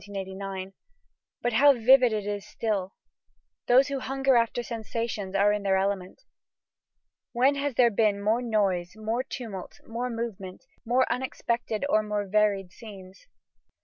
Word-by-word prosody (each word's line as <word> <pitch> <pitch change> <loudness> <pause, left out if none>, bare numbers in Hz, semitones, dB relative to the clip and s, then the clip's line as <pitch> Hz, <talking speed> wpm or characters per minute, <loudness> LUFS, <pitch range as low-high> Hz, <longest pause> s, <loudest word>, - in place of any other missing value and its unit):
But 240 - 0
how 280 +5 +6
vivid 250 0 +5
it 210 -2 -2
is 205 -1 -3
still! 200 -4 -3 0.7
Those 260 +3 +5
who 275 -1 -2
hunger 270 0 +1
after 235 +1 +1
sensations 225 -3 -4
are 205 +1 +4
in 210 - -2
their 195 -1 +2
element. 195 - -2 1.1
When 260 +4 +3
has 280 -2 -2
there 240 -1 +5
been 210 -1 +2
more 215 +4 +1
noise, 195 -7 0
more 220 +3 -2
tumult, 225 -8 -7
more 240 +2 -4
movement, 225 -3 -6 0.2
more 250 +2 +2
unexpected 240 -2 -2
or 215 -6 +3
more 210 -1 -2
varied 200 -2 +1
scenes? 195 - -13
220 Hz, 135 wpm, -27 LUFS, 200-245 Hz, 1.1 s, how